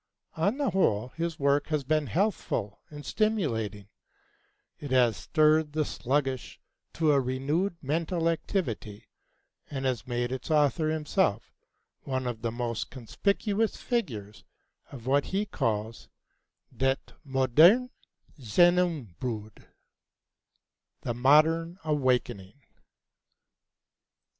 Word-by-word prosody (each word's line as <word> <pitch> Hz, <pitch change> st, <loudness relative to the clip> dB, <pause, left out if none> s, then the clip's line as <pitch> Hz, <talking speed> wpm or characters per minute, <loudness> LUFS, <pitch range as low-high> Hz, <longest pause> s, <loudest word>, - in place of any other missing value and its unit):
On 200 Hz, +10 st, +1 dB
the 285 Hz, -3 st, 0 dB
whole, 125 Hz, -, +1 dB
his 165 Hz, +2 st, -4 dB
work 140 Hz, +1 st, +2 dB
has 150 Hz, -3 st, -1 dB
been 155 Hz, +1 st, 0 dB
healthful 165 Hz, -, -1 dB
and 145 Hz, -1 st, -10 dB
stimulating; 115 Hz, -, -1 dB, 0.9 s
it 145 Hz, -, -7 dB
has 125 Hz, -4 st, +3 dB
stirred 155 Hz, -, +2 dB
the 155 Hz, -1 st, +1 dB
sluggish 135 Hz, -1 st, -2 dB, 0.3 s
to 160 Hz, -2 st, +2 dB
a 140 Hz, -1 st, +4 dB
renewed 145 Hz, +9 st, -1 dB
mental 165 Hz, +4 st, -1 dB
activity, 140 Hz, -, -2 dB, 0.6 s
and 135 Hz, -2 st, -4 dB
has 130 Hz, -1 st, -1 dB
made 120 Hz, 0 st, -2 dB
its 130 Hz, +3 st, -5 dB
author 155 Hz, +1 st, +2 dB
himself 155 Hz, -, 0 dB, 0.5 s
one 130 Hz, -1 st, -3 dB
of 120 Hz, -3 st, -4 dB
the 115 Hz, 0 st, -1 dB
most 120 Hz, -1 st, -3 dB
conspicuous 200 Hz, -, -1 dB
figures 110 Hz, -, -3 dB, 0.5 s
of 120 Hz, -4 st, -10 dB
what 140 Hz, +2 st, +2 dB
he 200 Hz, +2 st, -1 dB
calls 110 Hz, -, -3 dB, 0.7 s
"det 135 Hz, +3 st, -1 dB
Moderne 155 Hz, -, +4 dB, 0.5 s
Gjennembrud" 125 Hz, -, 0 dB, 1.3 s
the 120 Hz, -, -2 dB
Modern 155 Hz, +7 st, +3 dB
Awakening. 130 Hz, -7 st, -1 dB
140 Hz, 105 wpm, -28 LUFS, 120-165 Hz, 1.3 s, a